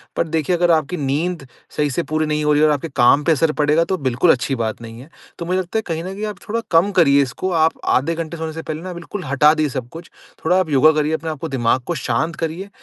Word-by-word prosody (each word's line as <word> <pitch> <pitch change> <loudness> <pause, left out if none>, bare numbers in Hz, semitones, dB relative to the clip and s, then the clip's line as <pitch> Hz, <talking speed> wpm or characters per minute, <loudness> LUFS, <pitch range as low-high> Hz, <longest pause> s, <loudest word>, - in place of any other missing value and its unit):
पर 170 - 0
देखिए 160 +2 0
अगर 175 0 +2
आपकी 160 +2 +1
नींद 145 +2 -2 0.3
सही 150 -1 +1
से 155 +6 -2
पूरी 155 0 0
नहीं 150 0 -1
हो 150 - +3
रही 145 - +2
है 155 - +5
और 150 - +3
आपके 145 +3 -4
काम 140 +4 +4
पे 165 - +2
असर 160 +1 +2
पड़ेगा 150 +2 +2
तो 190 - -1
बिल्कुल 135 +3 +2
अच्छी 130 +2 0
बात 115 -2 -3
नहीं 115 0 -10
है। 135 - -13 0.3
तो 170 - -4
मुझे 185 +2 0
लगता 185 +3 -3
है - - +1
कहीं 165 -1 -3
न 185 +2 -6
कहीं 210 +2 -4
आप 210 -2 -5
थोड़ा 230 - 0
कम 170 +4 +4
करिए 140 -5 +5
इसको 140 +8 -3
आप 160 -1 +3
आधे 155 +6 +1
घंटे 165 0 -5
सोने 160 0 -5
से 160 - -6
पहले 155 0 -6
ना 185 +1 -6
बिल्कुल 175 +3 -7
हटा 140 +3 +4
दें 155 -1 0
सब 130 -3 -5
कुछ। 165 +1 -11 0.3
थोड़ा 180 +3 +3
आप 185 -4 -1
योगा 150 +2 +5
करिए 155 0 0
अपने 160 0 -3
आपको 155 +1 -5
दिमाग 130 -1 +1
को 175 - -1
शांत 140 +5 -1
करिए, 165 +5 -4
160 Hz, 270 wpm, -19 LUFS, 140-170 Hz, 0.3 s, है